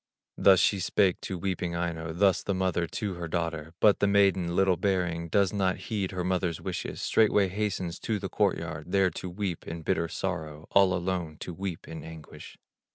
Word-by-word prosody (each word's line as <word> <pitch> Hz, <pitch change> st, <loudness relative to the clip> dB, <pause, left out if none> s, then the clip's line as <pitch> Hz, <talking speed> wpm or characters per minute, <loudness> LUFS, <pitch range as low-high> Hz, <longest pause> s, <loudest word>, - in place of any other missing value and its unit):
Thus 95 Hz, -2 st, +6 dB
she 100 Hz, +3 st, +3 dB
spake 95 Hz, 0 st, +2 dB
to 95 Hz, -, -4 dB
weeping 90 Hz, -2 st, -2 dB
Aino, 85 Hz, -2 st, -3 dB
Thus 95 Hz, +3 st, +3 dB
the 100 Hz, -, -2 dB
mother 90 Hz, -2 st, 0 dB
to 100 Hz, +2 st, -3 dB
her 85 Hz, -1 st, -5 dB
daughter; 80 Hz, -1 st, -3 dB
But 105 Hz, -2 st, +5 dB
the 100 Hz, -, +3 dB
maiden, 95 Hz, -4 st, +3 dB
little 95 Hz, -2 st, +3 dB
hearing, 90 Hz, -4 st, 0 dB
Does 100 Hz, 0 st, +2 dB
not 95 Hz, -2 st, +1 dB
heed 100 Hz, -4 st, -3 dB
her 90 Hz, -1 st, -3 dB
mother's 90 Hz, -2 st, -1 dB
wishes; -, -, -4 dB
Straightway 105 Hz, -3 st, +3 dB
hastens 95 Hz, -3 st, -2 dB
to 110 Hz, -2 st, -1 dB
the 95 Hz, -1 st, -4 dB
court 100 Hz, -1 st, +1 dB
yard, 80 Hz, 0 st, -6 dB
There 95 Hz, -2 st, +4 dB
to 90 Hz, -, -6 dB
weep 90 Hz, -2 st, -4 dB
in 85 Hz, 0 st, -6 dB
bitter 85 Hz, +2 st, 0 dB
sorrow, 80 Hz, -4 st, -4 dB
All 95 Hz, -2 st, +5 dB
alone 90 Hz, -3 st, -2 dB
to 90 Hz, -, -5 dB
weep 95 Hz, -1 st, -5 dB
in 80 Hz, 0 st, -7 dB
anguish. 80 Hz, -2 st, -11 dB
90 Hz, 190 wpm, -28 LUFS, 85-95 Hz, -, Thus